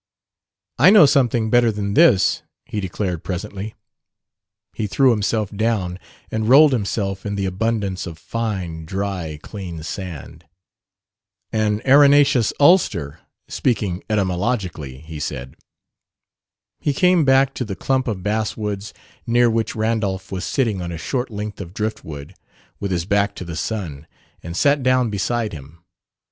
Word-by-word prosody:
"I 165 - +8
know 205 -5 +8
something 120 -5 +2
better 120 -2 +4
than 100 -1 -3
this," 160 - +4 0.2
he 105 - -4
declared 90 -3 -3
presently. 100 +3 -5 1.0
He 110 - -3
threw 130 +5 +4
himself 105 -1 0
down 100 -5 -1 0.3
and 110 0 -1
rolled 145 +2 +7
himself 100 -4 -2
in 100 -1 -3
the 100 -1 -1
abundance 100 -1 -2
of 85 -2 -8
fine, 90 -3 -4
dry, 95 -4 -4
clean 90 -6 -7
sand. 90 -3 -7 1.1
"An 110 0 0
arenaceous 140 -2 +5
ulster 100 - +3 0.3
speaking 100 -7 -1
etymologically," 90 - -2
he 80 -1 -8
said. 65 -4 -5 1.2
He 145 - 0
came 180 -1 +4
back 135 0 +4
to - - -3
the 105 -5 -5
clump 130 +6 0
of 100 -5 -3
basswoods 105 -1 -2 0.3
near 120 0 +4
which 115 0 -1
Randolph 110 -4 -1
was 95 -2 -3
sitting 110 -8 0
on 85 0 -4
a 85 - -5
short 125 - -3
length 105 -1 -6
of 90 0 -9
drift 110 +1 -3
wood, 70 -2 -9 0.5
with 100 - -3
his 85 -2 -1
back 100 +1 +1
to 90 - -7
the 85 -1 -6
sun, 85 -6 -4 0.3
and 85 +1 -6
sat 145 0 +3
down 130 -2 +2
beside 105 +2 -1
him. 75 +3 -11
105 Hz, 140 wpm, -21 LUFS, 90-115 Hz, 1.2 s, I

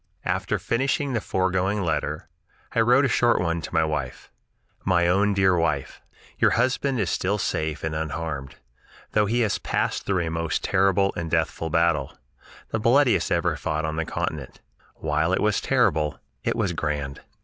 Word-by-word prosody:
After - - 0
finishing 135 +3 0
the 115 - 0
foregoing 95 +2 0
letter, 75 -2 -2 0.5
I - - +1
wrote 125 +5 +5
a - - +3
short 120 -1 +3
one 85 -1 -1
to - - -7
my 80 - +4
wife: 75 -5 -4 0.5
"My 85 -2 +3
own 100 +3 +2
dear 95 -2 +4
Wife: 80 -5 -1 0.4
"Your - - +5
husband 130 +2 +1
is 100 -6 0
still 100 +3 0
safe 80 -5 -2
and 80 - -2
unharmed, 80 -3 -4 0.6
though 105 -1 +2
he 120 +3 +1
has 110 -3 +1
passed - - -2
through 95 -4 +1
a 80 - -3
most 80 0 -2
terrible 95 0 +2
and 85 -1 -3
deathful 80 +1 -1
battle, 85 -4 +1 0.5
the 110 - -1
bloodiest 125 +3 +3
ever - - +1
fought 80 +1 -2
on 80 0 -3
the 80 - 0
continent. 75 -4 -4 0.4
While 80 +3 0
it - - +2
was 105 -1 +1
terrible, 75 -1 +1 0.2
it - - 0
was 105 -6 0
grand. 75 -3 -3
85 Hz, 170 wpm, -24 LUFS, 80-105 Hz, 0.6 s, wrote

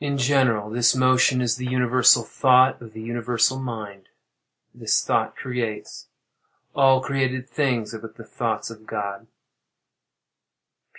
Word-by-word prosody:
V. 145 - -4
In 140 0 -2
general, 125 -6 +1
this 120 +2 +2
motion 130 0 +3
is 115 -1 -1
the 125 0 -5
universal 125 -1 +3
thought 130 +2 +3
of 115 -2 -12
the 110 - -9
universal 120 +2 -1
mind. 105 -6 -8 0.6
This - - 0
thought - - -1
creates. 120 -4 -6 0.7
All 135 -2 +4
created 130 -2 -2
things 125 -8 -2
are 110 - -7
but 115 0 -12
the 115 - -12
thoughts 115 -1 -4
of 110 -1 -14
God. 105 0 -5
125 Hz, 135 wpm, -23 LUFS, 110-130 Hz, 0.7 s, All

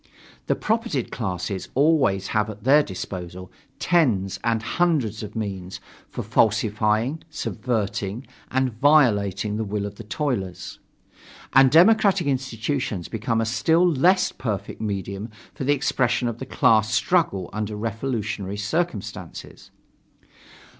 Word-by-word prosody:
The - - +2
propertied 220 - -1
classes 95 -3 -4
always 135 -10 +2
have 105 0 0
at 105 0 -9
their 140 +4 +6
disposal 90 - -7 0.3
tens 120 - +1
and 115 -2 0
hundreds 130 - 0
of 105 -1 -8
means 95 -4 -5 0.3
for - - -5
falsifying, 110 +5 +1
subverting 110 -5 -3 0.2
and 130 -2 0
violating 105 -7 +3
the 110 - -1
will 105 -1 -3
of 100 0 -7
the - - -8
toilers. 105 - -3 0.7
And 135 -1 +7
democratic 195 - +5
institutions 130 - -2
become 115 0 -1
a - - 0
still 165 +10 +3
less 175 +4 +3
perfect 100 -5 -5
medium 100 0 -4 0.2
for 135 - -5
the 145 - +4
expression 125 -3 0
of 120 -1 -4
the 130 - -6
class 110 -5 +3
struggle 105 - +1
under 105 0 -3
revolutionary 105 -3 -3
circumstances. 110 - -4
110 Hz, 120 wpm, -23 LUFS, 100-135 Hz, 0.7 s, And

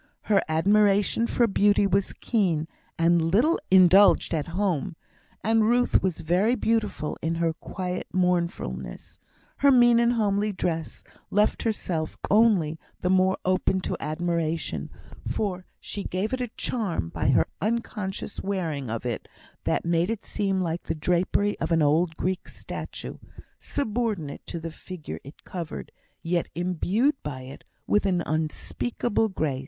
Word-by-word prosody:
Her 205 -2 +3
admiration 205 +6 +3
for 240 - +2
beauty 205 -1 +3
was 195 0 +1
keen, 175 -9 0 0.3
and 170 +1 +4
little 255 - +3
indulged 190 0 +6
at 155 -3 -1
home; 175 -2 -1 0.5
and 225 +1 +3
Ruth 245 +1 +3
was 185 -4 -1
very 185 +9 +2
beautiful 225 -9 -1
in 165 +1 -1
her 165 -1 +1
quiet 180 +1 -5
mournfulness; 170 - -2 0.4
her 280 - +5
mean 240 -3 +6
and 235 0 +3
homely 210 -2 +1
dress 165 -4 -3 0.3
left 210 +1 +2
herself 175 -8 -2
only 195 -8 +4 0.2
the 180 - +1
more 190 0 +3
open 185 0 +2
to - - -2
admiration, 165 0 -2 0.4
for 185 -4 -2
she 200 - -5
gave 190 +6 -2
it 260 - -1
a 250 - -1
charm 195 - -1
by - - -1
her - - +4 0.2
unconscious 215 -3 -3
wearing 165 - -2
of 115 +2 -4
it 120 -2 -3 0.4
that - - 0
made 170 +1 +2
it 225 -2 -3
seem 195 -2 -1
like 170 -1 -2
the - - -3
drapery 180 +5 +1
of - - -2
an 165 -2 +4
old 160 +3 +2
Greek 185 0 -2
statue - - -7 0.4
subordinate 215 - -2
to 170 - -4
the 165 0 -6
figure 175 -1 -8
it 140 +3 -13
covered, 170 -4 -6 0.3
yet 170 0 0
imbued 185 - +1
by 135 -3 -5
it 130 +2 -10 0.2
with 210 -1 +2
an 180 -3 +1
unspeakable 205 +8 -1
grace. 155 -8 -1
185 Hz, 145 wpm, -26 LUFS, 165-210 Hz, 0.5 s, indulged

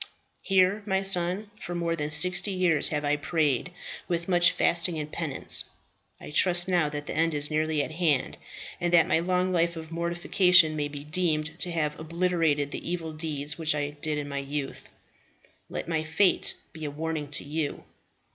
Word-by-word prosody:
"Here, 195 +2 +3
my 190 -1 +1
son, 195 +2 +1
for 175 -1 -5
more 170 -1 -1
than 150 -2 -3
sixty 180 +5 +2
years 180 -6 +1
have 150 -1 -2
I 145 +1 +2
prayed, 150 0 0 0.4
with 170 -1 -2
much 175 -2 +5
fasting 170 0 +2
and 150 0 -5
penance. 155 -5 0 0.5
I - - -10
trust 175 +3 +3
now 175 -5 +2
that 145 0 -5
the - - -4
end 165 0 +1
is 145 +1 -2
nearly 155 -1 +1
at - - -6
hand, 155 -5 0 0.4
and 175 0 0
that 165 -2 +7
my - - +3
long 180 +2 0
life 170 -1 +1
of 160 0 -8
mortification 170 0 +3
may 145 -1 -1
be 145 -1 -8
deemed 155 0 -1
to 180 - 0
have 150 -3 -1
obliterated 165 -3 0
the - - -5
evil 165 -2 -3
deeds 155 -1 -4
which 160 -2 +2
I 145 0 -2
did 150 +1 -3
in 145 -1 -4
my 140 0 -3
youth. 140 0 -5 0.8
Let - - -5
my 160 -2 -1
fate 160 +5 +1 0.2
be 160 -1 -9
a 150 - -2
warning 155 0 -3
to 145 - -2
you. 150 0 -3
160 Hz, 185 wpm, -27 LUFS, 150-175 Hz, 0.8 s, that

